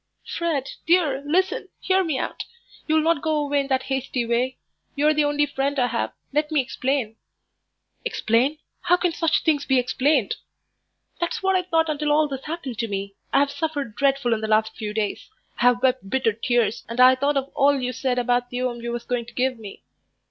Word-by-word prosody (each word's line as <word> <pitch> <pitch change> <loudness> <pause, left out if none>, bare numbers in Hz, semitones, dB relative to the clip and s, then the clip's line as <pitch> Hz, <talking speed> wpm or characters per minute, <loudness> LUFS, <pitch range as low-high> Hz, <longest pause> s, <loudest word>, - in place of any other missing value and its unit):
"Fred, 315 -6 -2 0.2
dear, 320 -6 +3
listen, 370 +5 0
hear 380 0 +2
me 315 -6 -1
out. - - -3 0.4
You'll 315 0 +3
not 330 -3 +2
go 315 -1 0
away 290 -1 +1
in 275 - -1
that 265 -1 +1
hasty 265 -2 -2
way. 240 +3 0 0.4
You're 300 +2 +3
the 300 -1 +2
only 290 0 +2
friend 280 0 -2
I 250 - +3
have. 235 -1 -1 0.2
Let 300 +1 0
me 305 - +3
explain." 255 -3 -1 0.9
"Explain! 285 - +1 0.2
how 355 - +3
can 355 -1 +1
such 330 -1 +1
things 300 -3 +2
be 265 - +3
explained?" 255 -1 +1 0.8
"That's 345 +2 -2
what 385 0 +3
I 370 - +3
thought 325 -3 +1
until 300 -1 -1
all 305 +1 +4
this 270 -2 -6
happened 290 -8 -5
to 230 - 0
me. 200 -1 -4 0.2
I - - +4
have 285 0 +1
suffered 285 -7 -3
dreadful 275 -1 +2
in 220 - -2
the 220 - -2
last 220 0 +2
few 215 -2 -4
days. 210 -1 -3 0.3
I've 245 0 +3
wept 255 -6 +1
bitter 245 -2 +1
tears, 230 0 0
and 230 +2 -5
I 255 +1 +8
thought 280 +2 +1
of 275 0 -2
all 280 0 +3
you 250 0 -2
said 250 0 -1
about 245 0 +1
the 250 +1 -3
'ome 240 -2 -2
you 235 0 -4
was 235 0 -4
going 240 -2 -2
to - - -12
give 255 -1 0
me." 205 -3 -10
270 Hz, 205 wpm, -23 LUFS, 240-300 Hz, 0.9 s, I